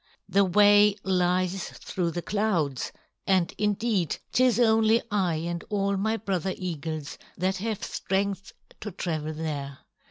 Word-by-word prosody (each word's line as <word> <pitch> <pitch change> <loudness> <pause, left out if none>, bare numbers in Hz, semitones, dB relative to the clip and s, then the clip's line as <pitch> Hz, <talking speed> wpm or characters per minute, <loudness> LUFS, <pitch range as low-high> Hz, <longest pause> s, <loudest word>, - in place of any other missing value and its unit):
The 200 - +3
way 205 +2 +6
lies 185 0 0
through 175 -2 -3
the 170 +1 -4
clouds, 180 - -1 0.4
and 185 -3 +2
indeed, 210 -3 0
'tis 250 -2 +3
only 225 -1 +4
I 185 -5 +1
and 170 +1 -3
all 200 -1 0
my 220 +3 0
brother 190 -3 -2
eagles 160 -4 -5 0.2
that 185 +2 0
have 215 +1 -3
strength 195 0 -2 0.3
to 210 - -5
travel 155 -4 -3
there. 145 -4 -4
190 Hz, 130 wpm, -27 LUFS, 170-205 Hz, 0.4 s, way